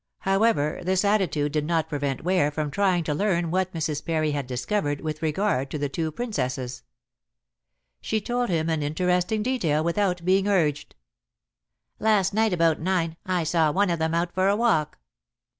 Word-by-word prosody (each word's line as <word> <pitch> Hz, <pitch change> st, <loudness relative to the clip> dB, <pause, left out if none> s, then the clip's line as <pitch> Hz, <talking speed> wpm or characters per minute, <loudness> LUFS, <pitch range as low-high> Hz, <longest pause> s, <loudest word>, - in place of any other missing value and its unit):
However, 195 Hz, -6 st, +1 dB
this 185 Hz, +2 st, +1 dB
attitude 180 Hz, -8 st, +1 dB
did 150 Hz, 0 st, 0 dB
not 165 Hz, -2 st, +1 dB
prevent 140 Hz, -1 st, -3 dB
Ware 180 Hz, -4 st, +2 dB
from 150 Hz, 0 st, -3 dB
trying 190 Hz, -3 st, +1 dB
to 155 Hz, -, -1 dB
learn 170 Hz, -1 st, 0 dB
what 185 Hz, +1 st, 0 dB
Mrs. 155 Hz, -3 st, -3 dB
Parry 155 Hz, -2 st, 0 dB
had 145 Hz, -3 st, -3 dB
discovered 145 Hz, +4 st, -2 dB
with 155 Hz, -1 st, -4 dB
regard 155 Hz, -4 st, 0 dB
to 150 Hz, -, -4 dB
the 145 Hz, -1 st, -2 dB
two 160 Hz, +3 st, -2 dB
Princesses. 130 Hz, -, -3 dB, 1.2 s
She 220 Hz, -, -1 dB
told 245 Hz, +2 st, -2 dB
him 165 Hz, -2 st, 0 dB
an 160 Hz, -2 st, 0 dB
interesting 180 Hz, +7 st, 0 dB
detail 170 Hz, -, 0 dB
without 180 Hz, 0 st, 0 dB
being 190 Hz, +2 st, +3 dB
urged. 155 Hz, -8 st, 0 dB, 1.0 s
"Last 210 Hz, -3 st, +2 dB
night 220 Hz, 0 st, +2 dB
about 165 Hz, -3 st, +2 dB
nine 165 Hz, -2 st, 0 dB
I 180 Hz, -2 st, +1 dB
saw 160 Hz, -1 st, +2 dB
one 195 Hz, +2 st, +2 dB
of 170 Hz, -, -1 dB
them 160 Hz, +1 st, 0 dB
out 170 Hz, +1 st, -1 dB
for 185 Hz, +1 st, +2 dB
a 200 Hz, -, +3 dB
walk." 210 Hz, -10 st, +1 dB
170 Hz, 170 wpm, -25 LUFS, 150-195 Hz, 1.2 s, being